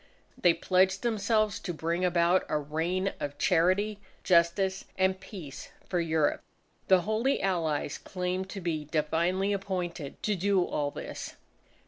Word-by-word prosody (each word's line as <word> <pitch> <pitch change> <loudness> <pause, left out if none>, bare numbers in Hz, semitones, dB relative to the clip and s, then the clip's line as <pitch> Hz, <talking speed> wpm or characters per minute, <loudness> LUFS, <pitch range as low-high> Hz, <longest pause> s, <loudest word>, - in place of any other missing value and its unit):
They 175 -2 +4
pledged 190 +3 +2
themselves 215 -2 +1
to 175 - -5
bring 170 +3 -1
about 175 0 +3
a 150 - +1
reign 165 +6 -1
of 145 0 -4
charity, 185 +6 +2 0.2
justice, 185 +2 +2
and 190 0 +2
peace 185 -7 -9 0.2
for 180 - 0
Europe. 160 -3 +1 0.5
The 190 -1 +6
Holy 220 +8 +1
Allies 165 -6 -1
claimed 185 0 -3
to 195 - -6
be 160 -3 -2
divinely 170 +6 0
appointed 180 -6 -4
to 210 - +1
do 190 0 +2
all 145 -1 -1
this. - - -7
180 Hz, 135 wpm, -29 LUFS, 165-195 Hz, 0.5 s, The